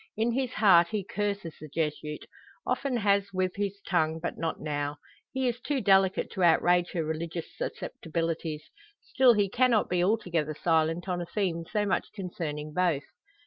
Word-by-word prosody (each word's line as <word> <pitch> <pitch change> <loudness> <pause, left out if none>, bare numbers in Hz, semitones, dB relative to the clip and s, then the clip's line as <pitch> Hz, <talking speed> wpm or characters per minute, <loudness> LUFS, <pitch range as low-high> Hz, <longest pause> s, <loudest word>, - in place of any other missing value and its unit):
In 225 +2 +2
his 255 0 -1
heart 175 -5 +6
he 210 +1 -2
curses 200 -4 -3
the 155 - -7
Jesuit 150 0 -3 0.4
often 270 -3 0
has 200 -2 +2
with 185 -1 -1
his 200 0 -2
tongue, 160 -3 +1
but 170 - -3
not 165 -1 -3
now. 145 -1 -3 0.3
He 265 -1 0
is 240 0 -1
too 285 0 -1
delicate 195 -3 +3
to 190 - -4
outrage 175 +1 +4
her 165 -3 -1
religious 160 +1 -4
susceptibilities. 165 -1 -4 0.3
Still 260 -2 +4
he 205 -1 +2
cannot 240 +1 +2
be 175 -1 +2
altogether 170 -7 0
silent 165 +2 +1
on 180 -1 -1
a 170 - -5
theme 170 -3 -1
so 210 -1 +1
much 200 - 0
concerning 155 -6 -5
both. 170 -5 +1
180 Hz, 165 wpm, -28 LUFS, 160-205 Hz, 0.4 s, heart